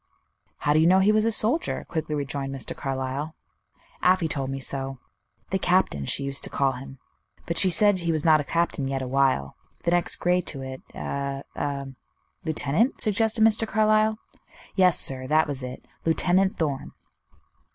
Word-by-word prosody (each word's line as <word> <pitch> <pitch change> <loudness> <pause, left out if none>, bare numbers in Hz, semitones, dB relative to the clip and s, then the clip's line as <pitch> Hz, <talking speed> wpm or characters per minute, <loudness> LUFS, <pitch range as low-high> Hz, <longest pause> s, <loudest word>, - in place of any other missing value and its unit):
"How 145 - +1
do 155 - +4
you 160 - +5
know 185 +2 +6
he 190 +2 +4
was 215 0 +3
a 230 - +2
soldier?" 235 +9 0
quickly 155 -2 -3
rejoined 140 -1 -3
Mr. 135 - -5
Carlyle. 135 +3 -3 0.7
"Afy 180 -2 +3
told 135 -3 -2
me 135 0 -3
so. 135 0 -3 0.5
'The 190 - +1
Captain' 180 - +1
she 140 - +1
used 140 0 -4
to - - +1
call 135 -1 +1
him; 135 +1 -9 0.5
but 170 - -1
she 190 - +5
said 205 +2 +4
he 170 -1 0
was 155 -1 -1
not 155 -1 +6
a - - -1
captain 155 -1 -1
yet 135 -1 -2
awhile 130 - +1 0.3
the 170 - +1
next 175 -1 +1
grade 180 0 +1
to 135 -3 -4
it, 130 0 -7
a 140 0 -3
a 140 -1 -3 0.3
" - - -46
"Lieutenant?" 160 - +1
suggested 220 +1 +2
Mr. 225 0 +3
Carlyle. 215 0 +3 0.6
"Yes, 185 -3 +4
sir, 130 -1 -3
that 155 +3 +3
was 140 -2 -4
it 125 0 -7 0.2
Lieutenant 185 +4 +2
Thorn." 145 -5 -2
155 Hz, 175 wpm, -25 LUFS, 135-185 Hz, 0.7 s, know